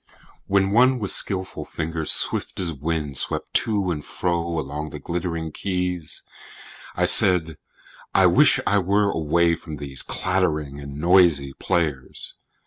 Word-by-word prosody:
WHEN 95 Hz, 0 st, +1 dB
one 125 Hz, +4 st, +4 dB
with 100 Hz, -5 st, -1 dB
skillful 95 Hz, -1 st, 0 dB
fingers 80 Hz, -1 st, -4 dB
swift -, -, -2 dB
as 85 Hz, -3 st, -2 dB
wind 75 Hz, -1 st, -4 dB
Swept -, -, -4 dB
to 105 Hz, -6 st, 0 dB
and 75 Hz, -3 st, -4 dB
fro 85 Hz, -2 st, -2 dB
along 75 Hz, +1 st, -5 dB
the 75 Hz, -, -8 dB
glittering 85 Hz, +1 st, -4 dB
keys, 90 Hz, -2 st, -4 dB, 0.7 s
I -, -, +1 dB
said: 85 Hz, -4 st, +6 dB, 0.5 s
I -, -, +3 dB
wish -, -, +4 dB
I 105 Hz, -, +2 dB
were 100 Hz, +2 st, +1 dB
away 85 Hz, +2 st, +1 dB
from 80 Hz, -2 st, -7 dB
these 70 Hz, -2 st, -4 dB
Clattering 75 Hz, -7 st, -2 dB
and 70 Hz, 0 st, -9 dB
noisy 85 Hz, -5 st, +3 dB
players! 75 Hz, -7 st, -3 dB
85 Hz, 135 wpm, -22 LUFS, 75-95 Hz, 0.7 s, said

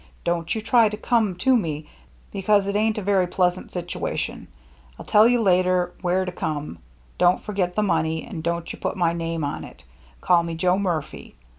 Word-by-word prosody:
Don't 170 Hz, +1 st, -1 dB
you 220 Hz, -, -4 dB
try 225 Hz, -1 st, +4 dB
to 210 Hz, -, -6 dB
come 220 Hz, -6 st, +1 dB
to 260 Hz, +9 st, +3 dB
me 155 Hz, -8 st, -2 dB, 0.4 s
because 200 Hz, 0 st, +2 dB
it 200 Hz, 0 st, -2 dB
ain't 215 Hz, +1 st, +1 dB
a 210 Hz, -, -3 dB
very 190 Hz, -2 st, +2 dB
pleasent 180 Hz, 0 st, 0 dB
situation 175 Hz, -1 st, -4 dB, 0.5 s
I'll -, -, -10 dB
tell 210 Hz, +2 st, +6 dB
you 240 Hz, -1 st, +2 dB
later 180 Hz, -2 st, +2 dB
where 185 Hz, +1 st, +1 dB
to 180 Hz, -, -4 dB
come 150 Hz, -, -4 dB, 0.4 s
don't 180 Hz, +1 st, +3 dB
forget 185 Hz, -4 st, -2 dB
the 215 Hz, -, +1 dB
money 160 Hz, -4 st, 0 dB
and 195 Hz, -9 st, -7 dB
don't 170 Hz, 0 st, -3 dB
you -, -, -11 dB
put -, -, -3 dB
my 170 Hz, -2 st, +2 dB
name 165 Hz, -1 st, -3 dB
on 145 Hz, -, -3 dB
it -, -, -13 dB, 0.4 s
call 175 Hz, -, +3 dB
me 170 Hz, -1 st, -4 dB
Joe 180 Hz, +3 st, +2 dB
Murphy. 170 Hz, -, -4 dB
180 Hz, 190 wpm, -23 LUFS, 170-205 Hz, 0.5 s, tell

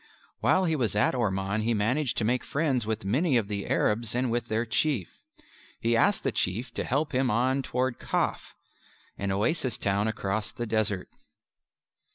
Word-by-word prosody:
While 185 Hz, -, +3 dB
he 160 Hz, -2 st, +1 dB
was 120 Hz, -8 st, 0 dB
at 105 Hz, -, +3 dB
Orman 100 Hz, -3 st, 0 dB
he 115 Hz, +1 st, +1 dB
managed 120 Hz, +7 st, 0 dB
to -, -, +1 dB
make 120 Hz, +3 st, +1 dB
friends 140 Hz, -6 st, 0 dB
with 110 Hz, -2 st, -2 dB
many 130 Hz, -, +2 dB
of 110 Hz, -4 st, 0 dB
the 100 Hz, -1 st, -3 dB
Arabs 115 Hz, +1 st, 0 dB
and 125 Hz, -1 st, +1 dB
with 120 Hz, +1 st, -1 dB
their 110 Hz, +2 st, 0 dB
Chief. 115 Hz, -, -1 dB, 0.6 s
He 115 Hz, 0 st, +1 dB
asked 205 Hz, -, +3 dB
the -, -, +1 dB
Chief 115 Hz, +7 st, -1 dB
to -, -, -2 dB
help 145 Hz, +4 st, 0 dB
him 130 Hz, 0 st, +2 dB
on 130 Hz, +4 st, +2 dB
toward 130 Hz, -1 st, -1 dB
Kaf -, -, -2 dB, 0.6 s
an 100 Hz, 0 st, -1 dB
oasis 120 Hz, -, 0 dB
town 100 Hz, +1 st, 0 dB
across 110 Hz, 0 st, -2 dB
the 120 Hz, -, -4 dB
desert. 110 Hz, -4 st, 0 dB
115 Hz, 175 wpm, -28 LUFS, 105-130 Hz, 0.6 s, While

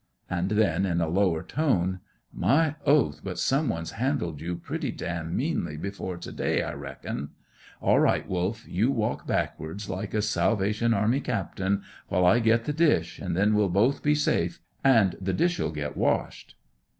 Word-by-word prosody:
And 90 Hz, +1 st, 0 dB
then, 100 Hz, -4 st, +2 dB
in 85 Hz, -2 st, 0 dB
a 85 Hz, -, +1 dB
lower 85 Hz, -1 st, +1 dB
tone, 95 Hz, -, 0 dB, 0.3 s
"My 145 Hz, -, +2 dB
oath, 105 Hz, -, +3 dB
but 90 Hz, -2 st, -5 dB
some 135 Hz, -, +1 dB
one's 80 Hz, -5 st, -3 dB
handled 115 Hz, -, -2 dB
you 85 Hz, +2 st, -3 dB
pretty -, -, -4 dB
damn 85 Hz, -1 st, -4 dB
meanly 75 Hz, -, -1 dB
before 95 Hz, 0 st, -5 dB
to -, -, -8 dB
day, -, -, 0 dB
I -, -, -4 dB
reckon. 70 Hz, +3 st, -6 dB, 0.5 s
All -, -, +4 dB
right, -, -, +2 dB
Wolf, 95 Hz, +5 st, -2 dB
you 105 Hz, +8 st, +1 dB
walk 115 Hz, -6 st, -1 dB
backwards, 90 Hz, +7 st, -2 dB
like 95 Hz, +3 st, -4 dB
a 105 Hz, -, +1 dB
Salvation 110 Hz, +1 st, +1 dB
Army 110 Hz, +7 st, +2 dB
captain, 100 Hz, -4 st, -1 dB, 0.2 s
while 90 Hz, -, +2 dB
I 115 Hz, +7 st, +5 dB
get 115 Hz, 0 st, +3 dB
the 150 Hz, -, -1 dB
dish, 150 Hz, -, +2 dB
an' -, -, -2 dB
then 100 Hz, +4 st, +3 dB
we'll 105 Hz, -2 st, +3 dB
both 110 Hz, +10 st, +2 dB
be 150 Hz, 0 st, +3 dB
safe, 85 Hz, -, 0 dB, 0.2 s
an' 115 Hz, -9 st, +5 dB
the 95 Hz, 0 st, -1 dB
dish'll 175 Hz, -, +1 dB
get 75 Hz, -1 st, -4 dB
washed." -, -, -1 dB
100 Hz, 170 wpm, -27 LUFS, 85-115 Hz, 0.5 s, I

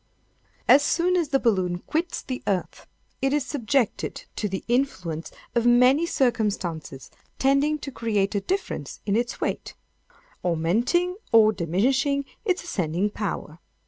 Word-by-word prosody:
"As 270 Hz, +3 st, +8 dB
soon 350 Hz, +5 st, +2 dB
as 340 Hz, -5 st, +1 dB
the 275 Hz, -, +3 dB
balloon 185 Hz, -7 st, +1 dB
quits 325 Hz, -, -3 dB
the 255 Hz, -1 st, -5 dB
earth, 190 Hz, -3 st, -2 dB, 0.3 s
it 270 Hz, +1 st, +1 dB
is 295 Hz, -2 st, +1 dB
subjected 255 Hz, -2 st, -1 dB
to 210 Hz, -, -2 dB
the 190 Hz, 0 st, -4 dB
influence 185 Hz, -, -1 dB, 0.2 s
of 235 Hz, 0 st, +2 dB
many 250 Hz, +7 st, +5 dB
circumstances 205 Hz, -, -1 dB, 0.3 s
tending 275 Hz, +3 st, +2 dB
to 280 Hz, -1 st, -7 dB
create 210 Hz, -5 st, 0 dB
a 200 Hz, -, 0 dB
difference 370 Hz, -, -3 dB
in 200 Hz, -1 st, +1 dB
its 240 Hz, +1 st, -1 dB
weight; -, -, -3 dB, 0.7 s
augmenting 225 Hz, -, +1 dB
or 220 Hz, -1 st, +6 dB
diminishing 265 Hz, -, +1 dB, 0.2 s
its 370 Hz, -4 st, 0 dB
ascending 185 Hz, -, -1 dB
power. 185 Hz, -6 st, -4 dB
240 Hz, 135 wpm, -25 LUFS, 190-280 Hz, 0.7 s, As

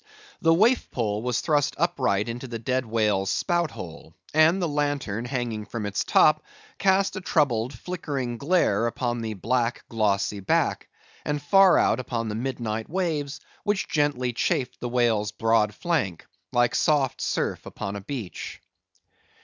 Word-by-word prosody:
The 165 Hz, -, +4 dB
waif 220 Hz, +10 st, +3 dB
pole 105 Hz, -3 st, -1 dB
was 125 Hz, 0 st, -1 dB
thrust 145 Hz, -3 st, +1 dB
upright 130 Hz, -, +1 dB
into 120 Hz, +3 st, -5 dB
the 120 Hz, -1 st, -5 dB
dead 125 Hz, +2 st, -1 dB
whale's 105 Hz, -4 st, +1 dB
spout 175 Hz, -3 st, +1 dB
hole; 85 Hz, -, -10 dB, 0.2 s
and 155 Hz, +4 st, +5 dB
the 175 Hz, -, 0 dB
lantern 145 Hz, -7 st, -1 dB
hanging 120 Hz, -4 st, -3 dB
from 115 Hz, -3 st, -4 dB
its 100 Hz, -, -1 dB
top, -, -, +4 dB, 0.4 s
cast 195 Hz, +1 st, +3 dB
a 190 Hz, -, -4 dB
troubled 130 Hz, -9 st, +1 dB
flickering 140 Hz, -8 st, -4 dB
glare 140 Hz, -, +2 dB
upon 120 Hz, 0 st, -2 dB
the 110 Hz, -1 st, -4 dB
black, 120 Hz, +4 st, -1 dB
glossy 105 Hz, -2 st, 0 dB
back, 95 Hz, -, 0 dB, 0.3 s
and 150 Hz, 0 st, -1 dB
far 190 Hz, +6 st, +5 dB
out -, -, +3 dB
upon 115 Hz, -3 st, -3 dB
the -, -, -3 dB
midnight 115 Hz, -2 st, -3 dB
waves, 155 Hz, -5 st, -2 dB, 0.2 s
which 205 Hz, -1 st, 0 dB
gently 140 Hz, -5 st, 0 dB
chafed 125 Hz, +2 st, -1 dB
the 120 Hz, -, -4 dB
whale's 115 Hz, -4 st, +1 dB
broad 110 Hz, -1 st, +2 dB
flank, 105 Hz, -, -1 dB, 0.3 s
like 120 Hz, 0 st, +2 dB
soft 145 Hz, -4 st, +1 dB
surf -, -, -1 dB
upon 100 Hz, +1 st, -5 dB
a 100 Hz, -, -5 dB
beach. 110 Hz, -4 st, -6 dB
125 Hz, 150 wpm, -25 LUFS, 110-150 Hz, 0.4 s, and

